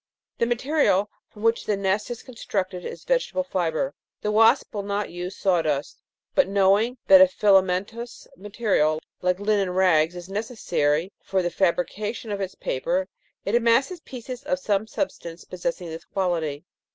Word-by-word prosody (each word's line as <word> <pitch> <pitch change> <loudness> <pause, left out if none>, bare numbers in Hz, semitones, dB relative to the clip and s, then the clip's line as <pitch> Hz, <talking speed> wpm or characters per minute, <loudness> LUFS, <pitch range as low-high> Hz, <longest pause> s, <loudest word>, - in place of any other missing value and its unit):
The 235 - +2
material 240 -5 +2 0.2
from 210 - -13
which 230 0 +2
the 210 - +1
nest 195 +3 0
is 240 -2 -6
con 255 - -12
structed 185 -5 -3
is - - -7
vegetable - - 0
fibre. 185 - -1 0.3
The 210 - -1
wasp 225 +1 +4
will 205 - -2
not 200 +1 -3
use 180 +2 -5
saw 185 -4 +2
dust; 150 -3 -2 0.3
but, 280 - +4
knowing 200 +5 +3
that 285 -1 +8
a 280 - +9
filamentous 200 0 +1
material, 195 -6 0 0.2
like 180 0 +1
linen 205 -2 +1
rags, 180 -3 +3
is 175 0 -8
necessary 190 -6 -1
for 190 -1 -1
the 175 - -1
fabrication, 200 +5 -1
of 200 -1 -3
its 190 -1 -4
paper, 180 +8 -1 0.4
it 200 - -1
amasses 240 +9 +3
pieces 255 -3 -8
of 280 -1 -1
some 215 -5 0
substance 170 - -5
possessing 180 -1 -4
this 160 0 -8
quality. 165 -6 -2
200 Hz, 160 wpm, -24 LUFS, 180-230 Hz, 0.4 s, a